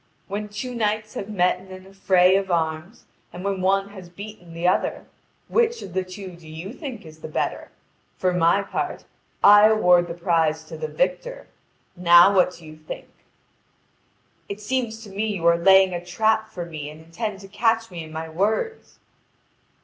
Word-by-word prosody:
When 210 +1 -4
two 245 +5 -5
knights 215 -2 -1
have 200 - -6
met 180 -3 +1
in 190 - -16
an 185 0 -11
affray 190 -1 +3
of 195 0 0
arms 165 +5 -2 0.3
and 180 - -8
when 195 -1 -1
one 195 +1 +1
has 190 -4 -11
beaten 180 -2 -11
the 170 +1 0
other, 180 - 0 0.4
which 475 0 +1
of 185 - -9
the 190 0 0
two 185 0 -9
do 170 -2 -16
you 165 +7 -7
think 260 - -8
is 155 0 -13
the - - -7
better? 155 - -3 0.5
For 185 -1 +1
my 180 +3 +3
part - - -4 0.4
I 205 +1 +8
award 180 -5 +4
the 170 - -6
prize 165 -3 +1
to 155 - -10
the 470 - -4
victor. - - -2 0.5
Now 175 +2 +7
what 180 -1 +3
do 170 - -15
you 155 0 -11
think?" 155 0 -9 1.4
"It 200 +1 -5
seems 225 0 -3
to 205 - -11
me 205 +3 -2
you 170 -3 -4
are 170 0 +6
laying 190 +2 +5
a 175 0 -4
trap 220 +4 +1
for 180 -5 -6
me 155 -3 -7
and 155 +1 -12
intend 195 +5 -5
to 195 - -11
catch 225 +2 0
me 170 -2 -6
in 155 - -11
my 160 +1 -5
words." 215 - -2
190 Hz, 185 wpm, -23 LUFS, 170-215 Hz, 1.4 s, I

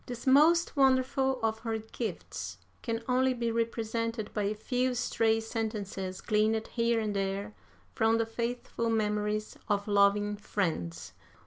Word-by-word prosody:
This 245 0 -6
most 310 +6 +5
wonderful 265 -1 +3
of 220 0 0
her 225 -1 -2
gifts 185 - -5 0.2
can 230 0 -3
only 255 0 +2
be 235 -1 -1
represented 230 -1 -2
by 210 -2 0
a 210 +2 0
few 250 +3 0
stray 225 -2 +2
sentences 215 -4 -4
gleaned 220 +1 +1
here 230 -1 +1
and 210 -2 -2
there 195 +1 -2 0.4
from 225 0 +3
the 230 - +1
faithful 235 0 -3
memories 210 -1 -1
of 205 0 0
loving 205 0 +3
friends.... 155 - -3
225 Hz, 135 wpm, -30 LUFS, 210-235 Hz, 0.4 s, most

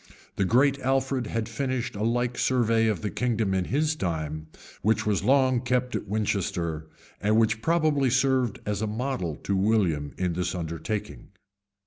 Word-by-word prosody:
The 100 - +1
great 135 +7 +3
Alfred 130 -2 0
had 115 0 -2
finished 130 -4 -2
a 100 - -5
like 120 +2 0
survey 115 -3 +2
of 105 -4 -1
the 105 - -2
kingdom 115 -5 0
in 95 -1 0
his 150 - +1
time, 80 - -3 0.3
which 110 +1 +1
was 105 -2 +1
long 130 -1 +4
kept 125 0 0
at - - -4
Winchester, 95 -6 -2 0.3
and 105 +1 +2
which 110 -1 +2
probably 155 -3 +2
served 130 -3 +2
as 105 -1 -2
a 110 - 0
model 105 - -2
to 100 - 0
William 95 -8 +1
in 90 -2 0
this 90 +2 -2
undertaking. 85 +5 -4
110 Hz, 160 wpm, -26 LUFS, 95-130 Hz, 0.3 s, long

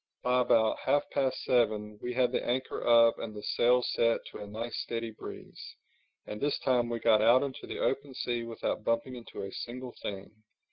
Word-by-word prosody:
By 125 0 +3
about 110 -2 +3
half 145 +2 +1
past 135 -2 0
seven 105 -4 +1
we 125 0 -4
had 125 -1 +2
the - - -1
anchor 130 +1 -2
up 115 -1 +6
and 110 -2 -6
the 105 - -8
sails 125 +1 +3
set 115 0 +2
to - - -9
a 105 - -7
nice 115 +3 -5
steady 115 -1 -3
breeze; 110 - -10 0.5
and 105 - -7
this 145 0 +1
time 125 -2 +1
we 120 - -1
got 110 -2 +4
out 120 +4 +5
into 135 -2 -6
the - - -5
open 135 0 -1
sea 120 -1 -2
without 115 -2 -3
bumping 115 +3 -1
into 120 -4 -8
a 100 - -6
single 125 +3 -6
thing. 100 +2 -7
120 Hz, 195 wpm, -30 LUFS, 110-125 Hz, 0.5 s, up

